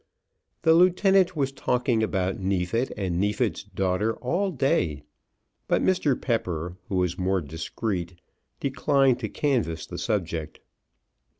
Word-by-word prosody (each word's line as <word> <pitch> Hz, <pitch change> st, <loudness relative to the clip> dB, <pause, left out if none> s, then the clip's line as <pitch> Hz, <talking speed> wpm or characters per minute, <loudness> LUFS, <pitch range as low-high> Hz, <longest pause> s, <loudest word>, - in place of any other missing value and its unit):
The 160 Hz, -, +6 dB
lieutenant 185 Hz, +1 st, +4 dB
was 135 Hz, -3 st, 0 dB
talking 125 Hz, -3 st, 0 dB
about 95 Hz, -3 st, -1 dB
Neefit 95 Hz, +6 st, 0 dB
and 90 Hz, -4 st, -1 dB
Neefit's 105 Hz, +2 st, 0 dB
daughter 95 Hz, +4 st, -1 dB
all 175 Hz, +10 st, -1 dB
day: 90 Hz, -, 0 dB, 0.6 s
but -, -, +2 dB
Mr. 155 Hz, -8 st, +2 dB
Pepper, 90 Hz, -8 st, -2 dB
who 95 Hz, -, -2 dB
was 90 Hz, -1 st, 0 dB
more 95 Hz, +1 st, +1 dB
discreet, 85 Hz, -, -4 dB, 0.4 s
declined 135 Hz, -2 st, +2 dB
to 110 Hz, -4 st, -3 dB
canvass 115 Hz, -, -1 dB
the -, -, -7 dB
subject. 85 Hz, -7 st, -2 dB
105 Hz, 120 wpm, -26 LUFS, 90-135 Hz, 0.6 s, The